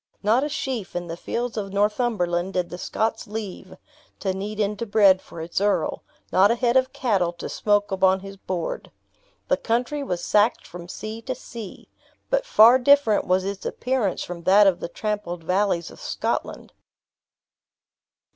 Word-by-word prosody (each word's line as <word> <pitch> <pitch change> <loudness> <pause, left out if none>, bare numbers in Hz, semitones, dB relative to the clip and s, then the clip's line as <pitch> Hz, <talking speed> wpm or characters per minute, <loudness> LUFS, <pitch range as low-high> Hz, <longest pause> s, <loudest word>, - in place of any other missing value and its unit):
Not 225 +6 +3
a 295 - -1
sheaf 250 -10 -4
in 175 0 -2
the 165 -1 -5
fields 235 +7 -4
of 200 -2 -3
Northumberland 200 -4 0
did 180 -1 -1
the 175 - -6
Scots 220 +3 -2
leave, 210 -2 -7 0.4
to 190 -2 -1
knead 205 +3 -5
into 210 +2 -1
bread 200 -3 +5
for 165 - -10
its 170 +3 -3
earl; 205 0 0 0.3
not 195 +2 +5
a 235 - +3
head 240 0 +1
of 260 0 +3
cattle 200 -11 0
to 170 - -7
smoke 205 -1 +1
upon 190 0 +3
his 195 0 -9
board. 185 -3 -4 0.6
The - - +2
country 245 +6 -1
was 180 -11 -3
sacked 210 +2 +2
from 175 0 -10
sea 215 +4 -6
to 255 +2 -4
sea. 230 -5 -10 0.4
But - - +1
far 235 - +7
different 270 -4 +4
was 185 +1 +2
its 200 0 -4
appearance 250 -6 -1
from 175 -1 -7
that 200 +2 +6
of 190 -3 +3
the - - -5
trampled 205 -5 -4
valleys 180 -1 0
of - - -14
Scotland. - - -3
205 Hz, 165 wpm, -24 LUFS, 185-230 Hz, 0.6 s, far